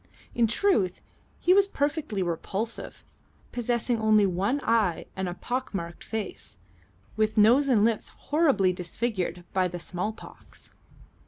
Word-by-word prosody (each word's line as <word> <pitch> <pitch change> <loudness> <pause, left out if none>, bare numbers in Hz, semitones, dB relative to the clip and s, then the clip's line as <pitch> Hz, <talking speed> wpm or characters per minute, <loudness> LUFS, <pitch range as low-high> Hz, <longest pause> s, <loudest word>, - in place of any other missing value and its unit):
In 235 -1 +3
truth 220 - +1 0.4
he 360 - +4
was 395 0 +5
perfectly 285 - -1
repulsive, 195 +6 -1 0.5
possessing 240 -1 -1
only 215 -1 +4
one 195 +9 0
eye 210 -8 +1
and 190 -1 -2
a 175 - -5
pockmarked 200 -9 -4
face, 210 - -5 0.6
with 215 0 0
nose 240 +7 +5
and 220 -6 +4
lips 230 -1 0
horribly 280 - +1
disfigured 180 -1 -3
by 185 -1 +2
the 175 0 -6
small 180 +4 -3
pox. 220 - -14
215 Hz, 130 wpm, -27 LUFS, 185-245 Hz, 0.6 s, was